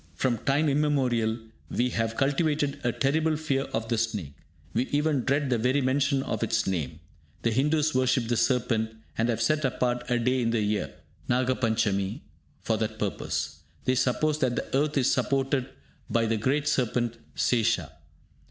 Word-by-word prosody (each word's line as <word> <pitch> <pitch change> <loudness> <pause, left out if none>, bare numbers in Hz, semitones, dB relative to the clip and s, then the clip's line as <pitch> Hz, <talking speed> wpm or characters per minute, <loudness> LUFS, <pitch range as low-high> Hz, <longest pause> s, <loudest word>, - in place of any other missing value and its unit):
From 120 -4 0
time 145 +5 +2
immemorial 130 -6 +1 0.3
we 125 +1 +1
have 115 -1 -1
cultivated 145 0 +1
a 120 - +2
terrible 155 +5 +1
fear 140 -3 -1
of 115 -2 -3
the 115 -1 0
snake; 105 -11 -2 0.4
we 120 +3 +1
even 145 -1 +1
dread 140 0 +1
the 120 - +2
very 125 +5 +2
mention 135 +1 +1
of - - -3
its - - +1
name. 85 -4 -2 0.4
The 115 - +2
Hindus 150 +5 +2
worship 130 -2 +2
the 120 - +1
serpent, 115 -2 +1 0.2
and 115 +2 +1
have 115 - 0
set 155 0 +2
apart 125 -2 -1
a 120 - +2
day 125 +2 +1
in 115 - +1
the 115 -1 +1
year 105 -2 0 0.4
(Nagapanchami) 115 -6 +1 0.4
for 110 - +1
that 110 0 -2
purpose. - - -3 0.3
They 130 - +3
suppose 140 +4 +1
that 125 -4 +1
the - - -3
earth 150 +2 +1
is 130 -2 +3
supported 135 -1 0 0.4
by 115 -1 +2
the 110 0 +1
great 140 +7 0
serpent 120 -4 0 0.2
Sesha. 115 - +1
125 Hz, 165 wpm, -27 LUFS, 115-140 Hz, 0.4 s, They